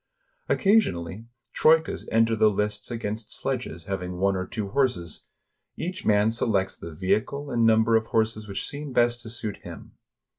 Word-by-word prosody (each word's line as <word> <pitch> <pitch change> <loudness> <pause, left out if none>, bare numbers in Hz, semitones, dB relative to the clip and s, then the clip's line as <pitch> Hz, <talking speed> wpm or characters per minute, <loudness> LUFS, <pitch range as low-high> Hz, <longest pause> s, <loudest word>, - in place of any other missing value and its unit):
Occasionally, 110 - +1 0.3
troikas 160 +1 +3
enter 115 0 +3
the 110 0 +5
lists 105 0 -2
against 110 -2 -4
sledges 120 -11 -3
hav 95 +1 -3
ing 90 0 -5
one 100 +1 +2
or 95 0 -3
two 105 -3 -4
horses. 95 - -1 0.5
Each 180 +3 -4
man 105 +1 +4
selects 100 -5 0
the 85 - -9
vehicle 130 - -1
and 115 -2 +3
number 110 0 +4
of 110 0 +2
horses 110 -1 0
which 100 - -4
seem 145 -1 -6
best 120 0 +2
to 115 - -9
suit 110 -2 -4
him. - - -11
110 Hz, 160 wpm, -26 LUFS, 100-120 Hz, 0.5 s, the